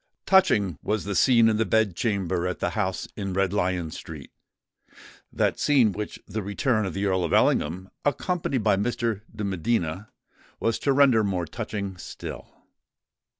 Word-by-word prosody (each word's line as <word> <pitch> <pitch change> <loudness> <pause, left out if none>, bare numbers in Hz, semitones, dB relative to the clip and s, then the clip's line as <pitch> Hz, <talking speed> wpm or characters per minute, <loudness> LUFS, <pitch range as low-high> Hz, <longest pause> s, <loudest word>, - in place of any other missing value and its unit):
Touching 105 - +3
was 105 0 -1
the 100 - -3
scene 115 +4 +5
in 110 -1 +2
the 115 - +2
bed 110 -5 +1
chamber 95 -5 -1
at 90 - -3
the - - -1
house 95 -4 -2
in 95 -3 -4
Red 95 0 +1
Lion 90 -4 -1
Street,—that 75 -4 -7
scene 130 -7 +4
which 105 +2 -6
the 110 - -3
return 105 +2 0
of 95 - -6
the 100 +1 -1
Earl 95 -2 +1
of 85 - -2
Ellingham, 90 +5 +2 0.2
accompanied 145 - -1
by 105 -2 +3
Mr. 115 0 -1
de 105 - -6
Medina, 95 -1 -1 0.5
was 115 0 0
to 140 - +1
render 135 -5 +5
more 95 -4 -1
touching 100 +2 -5
still. 85 - -8
100 Hz, 155 wpm, -25 LUFS, 95-115 Hz, 0.5 s, scene